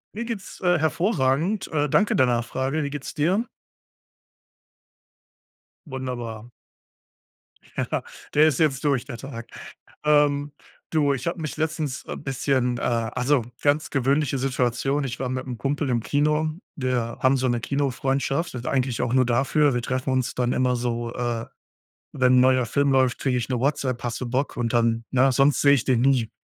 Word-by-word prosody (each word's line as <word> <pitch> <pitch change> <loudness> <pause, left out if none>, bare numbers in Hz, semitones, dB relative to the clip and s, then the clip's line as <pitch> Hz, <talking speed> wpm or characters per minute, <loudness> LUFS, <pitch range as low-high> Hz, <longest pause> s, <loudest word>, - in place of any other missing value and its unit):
Mir 235 - -3
geht 230 -3 -3
es, 190 - -12
äh, 180 -1 +3
hervorragend. 160 - 0
Äh, 150 -2 +1
danke 205 +9 +2
der 130 - +5
Nachfrage. 130 +5 -1
Wie 140 - -2
geht 145 -1 -6
es - - -6
dir? 180 +9 +1 2.4
Wunderbar. 120 -4 -6 1.3
Ja, - - -1 0.3
der 150 +2 +6
ist 145 -5 0
jetzt 140 -5 +1
durch 140 -5 +1
der 120 -5 -7
Tag. 120 -2 -8 0.6
Ähm, 145 -1 +3 0.4
du, 145 -3 +2
ich 135 +4 -4
habe 170 - -2
mich 155 -2 -5
letztens, 155 -3 -2
äh, - - -5
bisschen, 130 -3 0
äh - - -6
also, 120 +3 0 0.2
ganz 145 +1 +1
gewöhnliche 140 +1 +1
Situation, 135 +1 0
ich 130 -2 -4
war 130 -1 -2
mit 130 0 -3
'nem 125 -3 -5
Kumpel 140 +3 -1
im 120 -2 +1
Kino. 150 +7 +1 0.3
Wir 125 -3 -2
haben 130 +1 +4
so 130 0 0
'ne 120 -1 +1
Kinofreundschaft, 135 +1 -1
eigentlich 130 -3 0
auch 120 - -1
nur 130 -1 +4
dafür. 135 +4 +2
Wir 120 - 0
treffen 130 +2 -2
uns 130 -1 0
dann 125 0 0
immer 125 -1 +1
so 120 -1 -2
äh, 120 -2 -2 0.7
wenn 130 -2 +3
'n - - +7
neuer 130 -1 +4
Film 140 +4 +1
läuft, 130 -2 +2
kriege 125 -2 0
ich 120 - -3
'ne 125 -3 -1
WhatsApp: 130 -3 -1
„Hast 120 0 -3
du 125 - -3
Bock?“ 130 +4 -1
Und 120 -2 -1
dann, 115 -1 +1
ne, 130 +1 +4
sonst 135 +3 +3
sehe 140 0 +6
ich 135 -2 0
den 125 -3 +2
nie. 125 -3 +2
130 Hz, 175 wpm, -24 LUFS, 125-145 Hz, 2.4 s, n